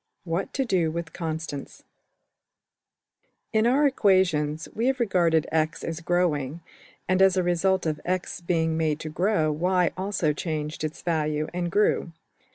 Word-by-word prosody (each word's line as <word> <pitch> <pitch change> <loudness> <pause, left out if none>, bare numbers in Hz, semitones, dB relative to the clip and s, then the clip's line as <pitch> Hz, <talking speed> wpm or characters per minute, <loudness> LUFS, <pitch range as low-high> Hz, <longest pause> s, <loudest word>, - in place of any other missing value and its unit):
What 175 +2 -2
to 270 - +1
do 180 -8 +1
with 165 0 -5
Constants} 160 -4 -5 1.7
\First{In} 220 +1 +3
our 285 +3 +3
equations 185 - +2
we 230 +3 0
have 265 -1 +1
regarded 170 -8 +2
$x$ 160 0 0
as 165 0 -4
growing, 165 -4 0 0.5
and 185 +1 +2
as 190 -1 +5
a 185 - +2
result 180 +2 +1
of 155 -2 -2
$x$ 180 0 -2
being 165 -2 0
made 155 -2 0
to 155 - -5
grow 165 -1 +1
$y$ 180 +3 +1
also 185 -5 0
changed 155 -1 -4
its 155 0 -5
value 155 -2 0
and 175 -1 -2
grew. 205 -4 +1
170 Hz, 150 wpm, -26 LUFS, 155-185 Hz, 1.7 s, as